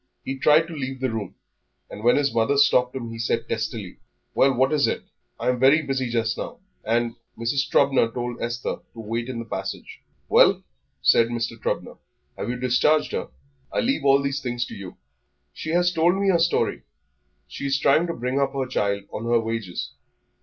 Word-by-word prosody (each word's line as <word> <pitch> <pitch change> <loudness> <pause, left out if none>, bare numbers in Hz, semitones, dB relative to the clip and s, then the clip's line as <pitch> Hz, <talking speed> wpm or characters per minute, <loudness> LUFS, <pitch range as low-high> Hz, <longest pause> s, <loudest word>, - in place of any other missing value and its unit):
He 135 - -3
tried 150 +4 +5
to 170 - -8
leave 130 -2 -4
the 130 -2 -1
room, 110 -4 -5 0.5
and 105 - -10
when 120 +1 +5
his 145 -3 +1
mother 115 +5 +2
stopped 125 -3 +4
him 120 -3 -5
he 115 - -8
said 115 +1 -1
testily, 110 -4 -4 0.3
"Well, 135 - +4
what 130 +3 +2
is 145 -2 +3
it? - - -2 0.4
I - - 0
am 125 -1 0
very 140 +5 +5
busy 135 -3 -1
just 115 -1 -1
now, - - -5 0.3
and 115 +1 0
" - - -45
Mrs. 120 +5 -1
Trubner 135 -4 +3
told 120 0 -4
Esther 120 +1 -3 0.2
to - - -10
wait 115 +2 -3
in 125 - -4
the 115 - -5
passage. - - -6 0.3
"Well," - - +5 0.4
said 115 - +5
Mr. 115 -1 -3
Trubner, 115 - -3 0.4
"have - - -4
you 125 - -1
discharged 130 +5 +2
her? - - -3 0.4
I - - 0
leave 250 - 0
all 140 0 +4
these 140 0 -1
things 120 -1 -2
to - - -10
you." 95 -3 -9 0.6
"She - - -6
has 175 +2 +2
told 170 +2 +3
me 195 0 +1
her 175 -3 +4
story; 165 - +1 0.7
she 140 - -5
is 135 0 +2
trying 155 +5 +3
to 170 - -3
bring 125 +3 -1
up 135 -1 0
her 135 -1 -1
child 100 -5 -1
on 115 - -4
her 120 0 +3
wages.... 115 -5 -4
125 Hz, 200 wpm, -24 LUFS, 115-140 Hz, 0.7 s, tried